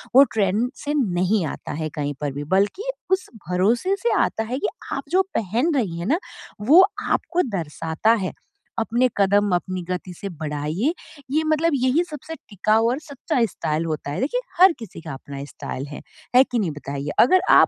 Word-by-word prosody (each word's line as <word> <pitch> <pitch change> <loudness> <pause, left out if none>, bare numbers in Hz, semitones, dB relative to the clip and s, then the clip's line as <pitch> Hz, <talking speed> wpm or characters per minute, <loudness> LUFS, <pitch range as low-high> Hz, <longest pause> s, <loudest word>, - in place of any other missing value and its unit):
वो 275 - +10
ट्रेंड 210 +3 +2 0.2
से 290 - 0
नहीं 190 - +1
आता - - -6
है 155 +1 -3
कहीं 145 -1 -2
पर 145 -1 -1
भी 145 +1 -4
बल्कि 285 - 0 0.2
उस 380 0 +1 0.2
भरोसे 230 - +2
से 475 - +2
आता 220 - -1
है 245 +4 -3
कि - - 0 0.3
आप - - -3
जो 370 +2 +4 0.2
पहन 235 - +1
रही 185 -10 -1
है 170 - -3
ना, 310 - +2 0.4
वो 320 - +7 0.2
आपको 345 +2 +1 0.2
दर्शाता 160 +6 0
है, 195 -5 -1 0.5
अपने 235 +3 +2
कदम 200 0 +3
अपनी 185 +1 -2
गति 180 0 -3
से 195 +3 -6
बढ़ाइए, 155 - -2 0.4
ये 310 +2 +2
मतलब 315 +2 +2
यही 260 +5 +2
सबसे 310 +2 -7
टिकाऊ 215 +3 +2
और 255 +4 -1
सच्चा 285 -3 -2
स्टाइल 160 -5 -2
होता 155 -3 -3
है - - -3
देखिए, 295 - 0 0.2
हर 375 +1 +9
किसी 220 -7 -9
का 160 -3 -6
अपना 140 +1 -7
स्टाइल 135 -1 -6
है, 145 - -8 0.3
है 255 - +9
कि 250 -3 -2
नहीं 185 -7 0
बताइए? 140 -1 -5
अगर 370 +10 +6
आप - - +8
210 Hz, 185 wpm, -23 LUFS, 165-275 Hz, 0.5 s, वो